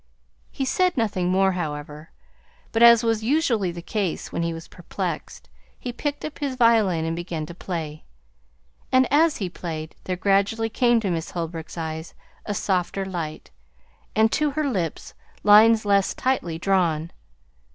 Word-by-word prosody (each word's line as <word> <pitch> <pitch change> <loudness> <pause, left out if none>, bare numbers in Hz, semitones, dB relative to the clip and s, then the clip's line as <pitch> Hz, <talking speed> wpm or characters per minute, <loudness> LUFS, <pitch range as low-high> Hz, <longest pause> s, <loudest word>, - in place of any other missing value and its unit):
He 270 - -3
said 365 +6 +1
nothing 195 -6 0
more, 190 +1 +3
however; 150 -3 -5 0.6
but, 225 - 0
as 235 0 +8
was 225 -1 0
usually 235 - +1
the 170 0 -8
case 195 -3 -3
when - - -2
he 170 0 0
was 165 0 -8
perplexed, - - -6 0.3
he 245 - -6
picked 290 +3 -3
up 310 - -7
his 280 -3 -2
violin 220 -9 +3
and 165 0 -2
began 170 -2 -4
to 170 - -9
play. 160 -4 -5 0.9
And 260 0 +5
as 315 +1 +4
he 195 - -2
played, 160 -3 -6
there 185 - -1
gradually 200 +4 +1
came 240 +1 +3
to 195 -4 -1
Miss 165 -1 -3
Holbrook's 165 -1 -5
eyes 160 0 -5 0.3
a 205 - -2
softer 190 0 -1
light, 170 -5 -6 0.6
and 220 +1 +4
to 300 0 +1
her 295 +1 -1
lips 180 - -3 0.3
lines 220 +1 +6
less 200 -1 +2
tightly 220 -11 -1
drawn. 170 -3 +1
195 Hz, 155 wpm, -24 LUFS, 170-230 Hz, 0.9 s, as